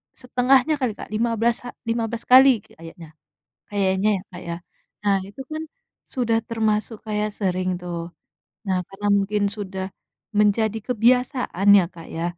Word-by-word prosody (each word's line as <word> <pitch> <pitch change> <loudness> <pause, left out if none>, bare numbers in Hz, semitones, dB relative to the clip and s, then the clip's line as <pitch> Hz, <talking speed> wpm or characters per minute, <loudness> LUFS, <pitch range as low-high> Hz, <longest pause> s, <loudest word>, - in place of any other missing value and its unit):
setengahnya 255 +3 +2
kali 245 -5 0
Kak, - - -9
lima 230 +2 0
belas 235 +1 +3
ha - - -5 0.2
lima 230 0 0
belas 235 -1 -5
kali 255 -4 +7
kayaknya. 165 -4 -13 0.6
Kayaknya 195 +1 +2
ya - - -7
Kak 175 0 -9
ya. 170 - -2 0.5
Nah 200 -1 +4
itu 205 +7 -10
kan 315 +1 -3 0.5
sudah 235 -3 +1
termasuk 220 0 0
kayak 210 0 -1
sering 185 -1 0
tuh, 175 -1 -4 0.7
nah 190 -1 +1
karena 200 +1 -6
mungkin 205 +1 0 0.2
sudah 190 -1 -4 0.5
menjadi 220 +1 +2
kebiasaan 250 - +1
ya 180 - +3
Kak 165 -1 -11
ya, 165 - -2
215 Hz, 150 wpm, -23 LUFS, 190-240 Hz, 0.7 s, kali